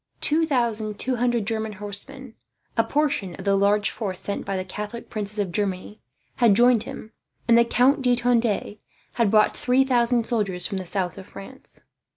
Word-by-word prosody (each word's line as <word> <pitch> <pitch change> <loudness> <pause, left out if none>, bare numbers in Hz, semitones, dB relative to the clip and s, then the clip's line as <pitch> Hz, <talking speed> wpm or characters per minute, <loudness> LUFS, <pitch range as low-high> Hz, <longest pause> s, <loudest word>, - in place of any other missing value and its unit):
Two 320 +2 +3
thousand 225 -6 -1
two 255 +2 -2
hundred 240 -2 0
German 220 -1 -3
horsemen, 210 +6 -3 0.4
a 230 - +3
portion 285 - -1
of - - -10
the 200 0 +3
large 205 +1 +2
force 195 -5 -5
sent 200 - -3
by 195 - -2
the 185 - -4
Catholic 210 +5 -7
princes 210 -1 -3
of 200 -4 -2
Germany, 200 +2 -3 0.4
had 230 -5 +4
joined 240 0 +4
him; 220 - -9 0.4
and 235 - +5
the 235 - +6
Count 265 +4 +2
de 250 -1 +3
Tende 235 -3 0 0.3
had 235 -4 +1
brought 215 0 +3
3000 250 -2 +2
soldiers 195 -7 -1
from 195 -3 -3
the 185 - -7
south 185 -1 -3
of 190 - -12
France. 260 +7 -12
220 Hz, 180 wpm, -23 LUFS, 200-245 Hz, 0.4 s, the